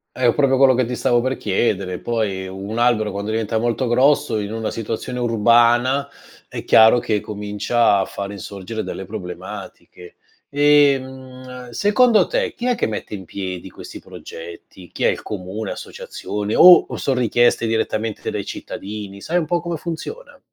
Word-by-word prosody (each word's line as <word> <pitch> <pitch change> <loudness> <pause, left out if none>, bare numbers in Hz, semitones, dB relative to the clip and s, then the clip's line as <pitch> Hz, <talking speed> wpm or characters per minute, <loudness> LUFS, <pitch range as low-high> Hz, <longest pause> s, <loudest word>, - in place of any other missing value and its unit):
È 125 -2 +3
proprio 135 -2 +3
quello 135 -2 +6
che 130 0 +1
ti 125 - -5
stavo 120 0 +1
per 130 +1 -2
chiedere, 95 -3 -1
poi 105 -5 -2
un 100 +4 -6
albero 120 -3 +2
quando 100 +2 -4
diventa 110 0 -1
molto 120 +2 0
grosso, 130 0 +2
in 105 +1 -4
una 110 -1 -3
situazione 115 +3 -5
urbana, 120 +3 +3 0.4
è - - -7
chiaro 110 +2 +6
che 110 -3 -1
comincia 105 +2 0
a 95 - 0
fare 100 0 -6
insorgere 100 +2 -6
delle 95 - -6
problematiche. 90 -2 -9 0.3
Ehm, 130 -3 +1
secondo 210 - +3
te - - -1
chi 245 - -4
è 250 - +2
che - - -1
mette 105 -1 -5
in 95 - -9
piedi 95 -1 -6
questi - - -10
progetti? 85 +2 -11
Chi - - -5
è? - - +6
Il - - -1
comune, 100 +1 -5
associazione 105 +1 -6
o 180 0 +8
o - - -6
son 135 -2 -1
richieste 120 -1 +2
direttamente 110 -1 -2
dai - - -4
cittadini? 100 -1 -7
Sai 170 - -1
un 165 - -2
po' 175 +2 0
come 170 -1 -4
funziona? 175 - -7
115 Hz, 165 wpm, -20 LUFS, 105-130 Hz, 0.4 s, o